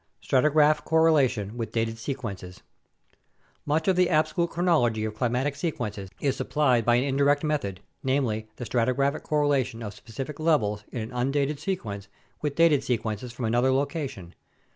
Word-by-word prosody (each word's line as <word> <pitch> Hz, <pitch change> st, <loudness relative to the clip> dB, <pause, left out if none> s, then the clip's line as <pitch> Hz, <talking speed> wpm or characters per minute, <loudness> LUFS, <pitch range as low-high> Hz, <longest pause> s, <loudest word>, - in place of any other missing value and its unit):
Stratigraphic 150 Hz, +2 st, +3 dB
Correlation 135 Hz, -10 st, +2 dB
with 115 Hz, -2 st, -4 dB
Dated 115 Hz, 0 st, -1 dB
Sequences 105 Hz, -8 st, -6 dB, 1.0 s
Much 155 Hz, +2 st, +1 dB
of 190 Hz, -, +4 dB
the 180 Hz, -1 st, +3 dB
absolute 170 Hz, +2 st, +1 dB
chronology 150 Hz, -12 st, +1 dB
of 110 Hz, -, -3 dB
climatic 125 Hz, +5 st, -1 dB
sequences 115 Hz, -, -4 dB
is 135 Hz, -2 st, 0 dB
supplied 130 Hz, -6 st, +2 dB
by 120 Hz, +2 st, +4 dB
an 125 Hz, -, +2 dB
indirect 140 Hz, +2 st, +2 dB
method, 140 Hz, -12 st, -2 dB, 0.2 s
namely, 125 Hz, -5 st, 0 dB
the 125 Hz, -, -6 dB
stratigraphic 130 Hz, +5 st, +1 dB
correlation 140 Hz, -6 st, 0 dB
of 105 Hz, -2 st, -5 dB
specific 130 Hz, +8 st, -7 dB
levels 110 Hz, -11 st, +1 dB
in 120 Hz, -, -4 dB
an 110 Hz, -, -6 dB
undated 135 Hz, +3 st, 0 dB
sequence 105 Hz, -, -4 dB, 0.3 s
with 150 Hz, -2 st, -2 dB
dated 165 Hz, -4 st, +4 dB
sequences 115 Hz, -1 st, -2 dB
from 120 Hz, 0 st, -5 dB
another 120 Hz, +4 st, +2 dB
location. 135 Hz, -, -2 dB
130 Hz, 145 wpm, -26 LUFS, 115-150 Hz, 1.0 s, of